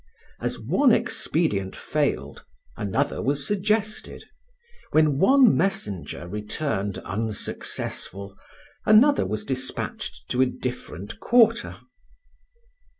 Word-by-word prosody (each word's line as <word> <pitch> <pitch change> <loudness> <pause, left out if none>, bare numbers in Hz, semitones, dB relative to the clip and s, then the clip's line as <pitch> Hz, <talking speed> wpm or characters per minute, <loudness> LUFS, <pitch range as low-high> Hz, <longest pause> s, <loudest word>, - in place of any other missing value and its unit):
As - - -3
one - - +3
expedient 95 -2 0
failed, 70 +3 -2 0.3
another 105 +8 -1
was 140 +1 -1
suggested; 210 +2 -1 0.7
when 155 -3 +3
one 255 - +6
messenger 130 - -2
returned 105 - -3
unsuccessful, 100 -2 -3 0.5
another 250 +7 +5
was 105 0 -3
despatched 130 - -4
to 125 - +1
a 130 - +5
different 125 -7 -6
quarter. 235 -1 +3
130 Hz, 90 wpm, -25 LUFS, -, 0.7 s, one